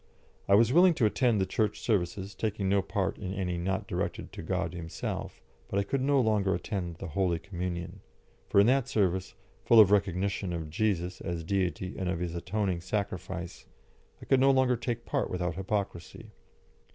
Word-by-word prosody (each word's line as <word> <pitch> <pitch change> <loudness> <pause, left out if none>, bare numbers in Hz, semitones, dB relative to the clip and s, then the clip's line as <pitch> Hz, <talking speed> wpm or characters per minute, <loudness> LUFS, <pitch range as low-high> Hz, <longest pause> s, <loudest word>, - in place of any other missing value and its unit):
I 100 - +6
was 115 +4 +4
willing 175 +1 +6
to 120 - +2
attend 115 0 +2
the 95 - +2
Church 110 +2 -1
services, 95 -2 -1
taking 105 -2 -2
no 100 +1 +3
part 95 0 -2
in 95 -1 -4
any 90 -2 -2
not 95 +2 -1
directed - - -3
to - - -7
God 85 - -2
Himself, 85 -2 -5 0.3
but 100 - -2
I 100 - +2
could 130 +7 -1
no 140 +1 +3
longer 105 -5 +2
attend 90 -5 -4
the 85 - -7
Holy 90 0 +1
Communion, 85 -1 -5 0.5
for - - +4
in 100 - +7
that 130 +1 +3
service, 95 -5 0 0.3
full 115 +2 +6
of 105 -3 +8
recognition 100 -1 +1
of 80 -2 -5
Jesus 90 -1 -1
as 85 -2 -4
Deity 90 0 -1
and 95 -2 -1
of 90 - -1
His 85 -1 -3
atoning 90 0 -2
sacrifice, 95 -2 -4 0.5
I - - -11
could 135 - +3
no 135 +1 +5
longer 130 -2 +4
take 120 0 -4
part - - -1
without 90 -1 -2
hypocrisy. 95 -2 -4
95 Hz, 180 wpm, -29 LUFS, 90-110 Hz, 0.5 s, of